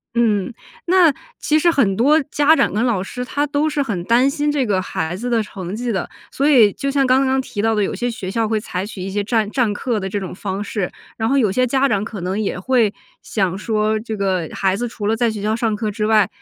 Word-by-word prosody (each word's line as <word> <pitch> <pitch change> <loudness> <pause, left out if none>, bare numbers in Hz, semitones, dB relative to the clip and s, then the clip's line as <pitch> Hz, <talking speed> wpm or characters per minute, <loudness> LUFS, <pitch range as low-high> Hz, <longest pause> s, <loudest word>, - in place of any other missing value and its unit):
嗯， 215 -5 +1 0.4
那 350 -4 +5 0.3
其 310 +1 +2
实 345 - +4
很 240 - +2
多 285 +9 +4
家 295 +2 +4
长 - - +1
跟 215 +3 +1
老 215 -7 0
师 250 +5 -5
他 285 +3 -1
都 295 +1 0
是 295 -1 0
很 200 -9 -3
担 240 +5 +4
心 290 +1 0
这 285 -3 0
个 200 -4 +1
孩 160 -1 -3
子 240 +6 -4
的 230 -2 +2
成 190 -2 -7
绩 240 +1 -2
的， 190 -4 -2 0.2
所 280 +2 +1
以 225 -9 +6
就 275 - -3
像 275 -1 +2
刚 260 +1 +3
刚 265 0 +2
提 230 -5 -4
到 225 +1 +2
的， 210 - +1
有 - - -2
些 245 - -2
学 195 -5 -5
校 225 +1 0
会 220 -1 +1
采 185 -3 -4
取 205 -2 -8
一 190 - -4
些 205 +1 -1
占 220 -1 0
占 245 -4 +1
课 220 +2 -2
的 190 -1 -4
这 205 - -2
种 190 -2 -6
方 195 +1 -4
式。 205 -3 -3 0.3
然 225 0 0
后 275 - +2
有 220 -7 +3
些 255 +5 +2
家 270 +2 +2
长 205 -6 0
可 215 -3 -6
能 185 +4 -2
也 200 -3 -2
会 230 0 +2 0.3
想 190 -4 -1
说， 215 +1 0
这 220 0 -5
个 185 -5 -1
孩 190 -1 +1
子 240 +4 -2
除 225 -2 -6
了 220 +2 +2
在 235 +1 +1
学 215 -2 -5
校 215 +1 +1
上 225 -2 0
课 215 0 -2
之 210 +1 -2
外， 215 -3 +4
220 Hz, 280 characters per minute, -19 LUFS, 200-255 Hz, 0.4 s, 以